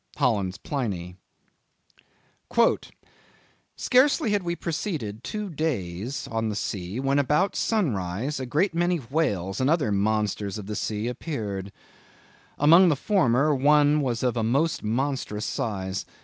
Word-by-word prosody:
—Holland's 105 -8 +1
Pliny. 100 -10 -4 2.6
"Scarcely 260 -1 +3
had 205 -1 +2
we 170 -1 -2
proceeded 155 - -4
two 210 -1 -4
days 125 - -3
on 115 -1 -1
the 105 - -3
sea, 95 +1 -4
when 135 +1 +2
about 150 +8 +2
sunrise 130 - -1
a 130 - -4
great 165 +9 +1
many 175 +1 +1
Whales 115 - -1
and 130 - +2
other 150 -9 +2
monsters 105 0 0
of 105 - -7
the 105 +1 -5
sea, 105 +2 -2
appeared. 105 - -4 0.9
Among 170 +5 +7
the 155 - +3
former, 150 - +2
one 145 +2 +4
was 120 -4 -1
of 125 -1 +1
a 115 - 0
most 140 +9 +1
monstrous 115 -2 -2
size.... 95 -3 -3
130 Hz, 130 wpm, -25 LUFS, 105-155 Hz, 2.6 s, Among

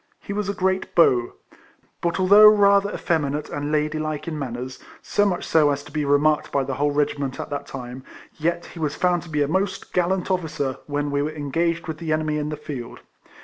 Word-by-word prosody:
He 200 - -6
was 205 -1 -2
a 200 - -2
great 190 0 -1
beau; 125 -8 +4 0.7
but 170 +2 -1
although 200 +3 +8
rather 200 -1 +5
effeminate 150 -6 -1
and 145 +1 -3
ladylike 155 0 -1
in 155 -2 -4
manners, 125 -1 -5 0.2
so 205 0 +2
much 180 -3 -2
so 155 -2 +4
as 140 0 -1
to 150 - -14
be 150 -1 -1
remarked 145 +2 +2
by 140 - +1
the 135 0 -3
whole 145 +3 +1
regiment 145 -2 -1
at - - -6
that 145 - -4
time, 125 0 -8 0.4
yet 170 +2 -1
he 170 - -10
was 150 -3 -1
found 180 -1 +1
to 170 - -12
be 150 -2 +1
a - - -1
most 190 +4 -2
gallant 180 +1 0
officer 150 -7 -2
when 145 0 -2
we 140 0 +1
were 150 - -1
engaged 165 +3 -2
with 155 -1 -5
the 165 -2 -3
enemy 155 -1 0
in 150 0 -3
the 150 - -4
field. 140 -5 -7
155 Hz, 210 wpm, -23 LUFS, 145-175 Hz, 0.7 s, although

